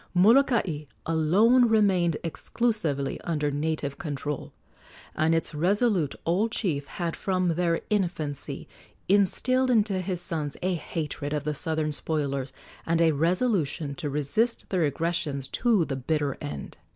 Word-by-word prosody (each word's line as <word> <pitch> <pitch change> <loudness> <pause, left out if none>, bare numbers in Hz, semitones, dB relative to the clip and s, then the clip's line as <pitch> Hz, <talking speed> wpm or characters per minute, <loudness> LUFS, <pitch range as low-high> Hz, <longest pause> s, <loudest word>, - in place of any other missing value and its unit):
Molokai 210 - +4 0.2
alone 195 +11 +4
remained 190 -7 +3
exclusively 165 - -1
under 150 -4 -1
native 145 -1 -2
control, 145 -2 -4 0.6
and 160 +1 +2
its 165 - -1
resolute 185 - +1
old 195 +7 +1
chief 150 -11 -1
had 170 -2 -3
from 185 -2 0
their 170 0 +1
infancy 170 -8 -2 0.4
instilled 255 +7 +3
into 210 -5 +2
his 180 -1 -3
sons 160 -5 -3
a 185 0 +1
hatred 150 -3 -4
of 150 -1 -1
the 150 0 -1
southern 155 0 -1
spoilers 140 -3 -2 0.3
and 165 0 +1
a 165 -1 +5
resolution 165 - 0
to 150 0 -4
resist 150 - -1
their 180 -4 +2
aggressions 145 -3 -1
to 225 -8 +2
the 135 - -3
bitter 145 +1 -1
end. 70 -1 -6
165 Hz, 130 wpm, -27 LUFS, 150-195 Hz, 0.6 s, a